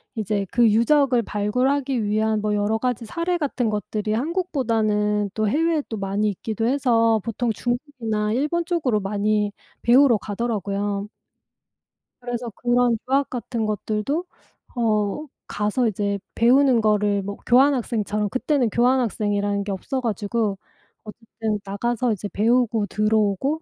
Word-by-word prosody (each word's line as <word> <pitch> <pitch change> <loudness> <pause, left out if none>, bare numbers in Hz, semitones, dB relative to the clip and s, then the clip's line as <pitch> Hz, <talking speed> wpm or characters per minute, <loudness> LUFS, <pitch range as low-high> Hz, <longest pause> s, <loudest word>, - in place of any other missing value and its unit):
이제 205 -3 -2
그 240 -1 +4
유적을 250 +2 +3
발굴하기 250 +5 0
위한 215 +1 0
뭐 210 0 0
여러 210 +2 0
가지 245 -1 -2
사례 340 +8 -1
같은 260 -7 -1
것들이 210 +1 -2
한국보다는 220 - 0
또 215 -1 0
해외에 315 +4 +1
또 220 - -5
많이 200 +2 0
있기도 220 +3 -3
해서 230 -4 +2
보통 230 +1 -1
중국이나 240 -4 -2
일본 300 +7 0
쪽으로 290 -11 0
많이 205 +1 0 0.3
배우러 250 0 +5
가더라고요. 205 -2 -3 1.1
그래서 245 -1 -4
그런 240 -1 +2
유학 275 +1 +2
같은 235 -2 -3
것들도 215 - -2 0.5
어 220 +3 0 0.2
가서 210 +4 0
이제 200 -1 -1 0.2
배우는 255 +1 +4
거를 210 -2 +1
뭐 200 +1 -5
교환학생처럼 235 -5 +2
그때는 255 0 0
교환학생이라는 210 -5 +1
게 200 - -3
없어 260 +7 -3
가지고 215 -2 -1 0.5
어쨌든 220 -1 -5
나가서 235 +4 -1
이제 205 0 -5
배우고 230 0 +2
들어오고 215 - +1
225 Hz, 310 characters per minute, -23 LUFS, 210-250 Hz, 1.1 s, 배우러